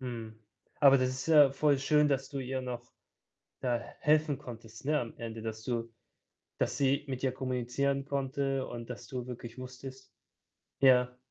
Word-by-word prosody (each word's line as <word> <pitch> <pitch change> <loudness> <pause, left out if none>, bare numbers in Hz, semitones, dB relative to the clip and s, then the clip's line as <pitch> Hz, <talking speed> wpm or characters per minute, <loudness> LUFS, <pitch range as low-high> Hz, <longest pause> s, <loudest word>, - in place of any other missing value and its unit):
Mhm. 115 -3 -6 0.4
Aber 140 -2 +8
das 130 0 +1
ist 130 +3 -5
ja 150 -4 +8
voll 140 0 +2
schön, 150 +2 +3
dass 135 -2 0
du 140 - -5
ihr 130 0 -2
noch, 125 -1 -6 0.7
da 120 -2 +1
h - - -12
helfen 150 -2 +3
konntest, 115 -4 -10
ne, 150 +1 +2
am 115 - -6
Ende. 115 -1 -6
Das 110 -1 -5
du 115 -2 -2 0.7
das - - 0
sie 140 +1 +2
mit 130 -2 -4
dir 130 -1 +1
kommunizieren 130 +2 -1
konnte 135 -1 -1
und 120 0 -7
dass 125 0 -7
du 125 0 -5
wirklich 120 -1 -8
wusstest 130 +1 -9 0.7
ja. 125 -2 +5
130 Hz, 170 wpm, -31 LUFS, 120-140 Hz, 0.7 s, Aber